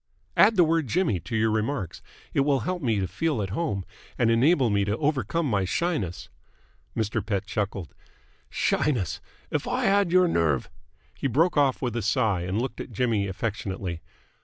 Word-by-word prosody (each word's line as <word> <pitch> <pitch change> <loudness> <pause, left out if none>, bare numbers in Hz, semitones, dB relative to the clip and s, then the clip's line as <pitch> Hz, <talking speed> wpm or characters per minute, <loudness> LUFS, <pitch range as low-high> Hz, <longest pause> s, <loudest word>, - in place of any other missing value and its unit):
"Add 225 - +6
the 180 - +6
word 165 -3 +1
Jimmy 155 - +1
to 110 +8 -6
your 110 0 +2
remarks. 110 - -2 0.3
It - - +1
will 140 -2 +2
help 180 - -2
me 115 -6 +1
to 95 - -1
feel 160 - -1
at 95 -2 -3
home 105 - -2 0.3
and 115 -1 +3
enable 130 +1 +4
me 100 0 +2
to 105 +2 -1
overcome 150 +1 0
my 105 -8 +1
shyness." 100 - -2 0.7
Mr. 110 -2 -1
Pett 100 -3 -2
chuckled. 100 -3 -3 0.6
"Shyness! 120 - 0 0.3
If - - -1
I - - 0
had 200 -3 +3
your 185 0 +5
nerve 80 - +1 0.2
!" - - -35
He - - 0
broke 160 +8 +2
off 140 -3 +2
with 120 -3 -1
a 120 - -1
sigh 105 -2 +1
and 90 +4 -1
looked 130 +3 -3
at - - -8
Jimmy 115 -6 0
affectionately. 95 -3 -4
115 Hz, 180 wpm, -26 LUFS, 100-150 Hz, 0.7 s, Add